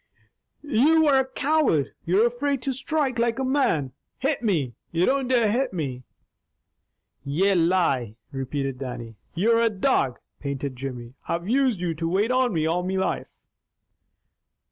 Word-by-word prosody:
"You 300 +4 +4
are 275 -3 +5
a 265 - 0
coward! 275 - +1
You're 190 +7 +4
afraid 270 +3 -1
to 270 - -1
strike 270 -2 -1
like 235 -1 +1
a 265 - -1
man! 255 - +1 0.3
Hit 280 0 0
me! 160 - 0 0.2
You 170 +2 +2
don't 270 -1 +1
dare 235 -4 +3
hit 250 0 0
me!" 135 -7 -3 1.2
"Ye 175 +8 +2
lie!" 165 - +1 0.2
repeated 135 -1 -3
Dannie. 120 -4 -6 0.2
"You're 230 +6 +3
a 230 - +4
dog!" 190 - +1 0.2
panted 140 -1 -4
Jimmy. 125 -2 -6
"I've 170 +2 -2
used 250 -5 +2
you 175 -2 -1
to 165 +1 -3
wait 205 +7 +1
on 255 -1 +2
me 160 -4 0
all 170 +3 +1
me 185 +1 -2
life!" 190 - -2
190 Hz, 150 wpm, -25 LUFS, -, 1.2 s, are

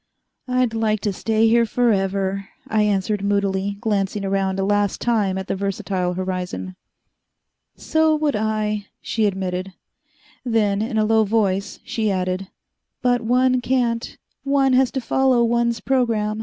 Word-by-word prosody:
"I'd 250 -2 +1
like 220 -1 0
to 205 - -1
stay 220 +3 +1
here 230 +1 +4
forever," 195 -4 0 0.2
I 215 0 +1
answered 205 0 0
moodily, 200 0 0
glancing 205 -2 -1
around 195 0 0
a - - +1
last 205 0 +1
time 210 -5 +1
at 190 - -4
the - - -2
versatile 190 -2 -2
horizon. 185 0 -4 1.0
"So 315 0 +2
would 300 -2 0
I," 210 -1 -1
she 220 -2 0
admitted. 190 -1 -3 0.7
Then, 215 -4 +1
in 220 0 -2
a 215 - +3
low 220 0 +4
voice, 200 -2 0
she 220 -2 -1
added, 185 0 -1 0.6
"But 245 -1 +2
one 250 +2 +2
can't. 240 -3 -1 0.3
One 275 -1 +2
has 255 0 +4
to 265 - -1
follow 255 0 +2
one's 235 0 +1
program." 225 -5 0
215 Hz, 140 wpm, -21 LUFS, 195-235 Hz, 1.0 s, here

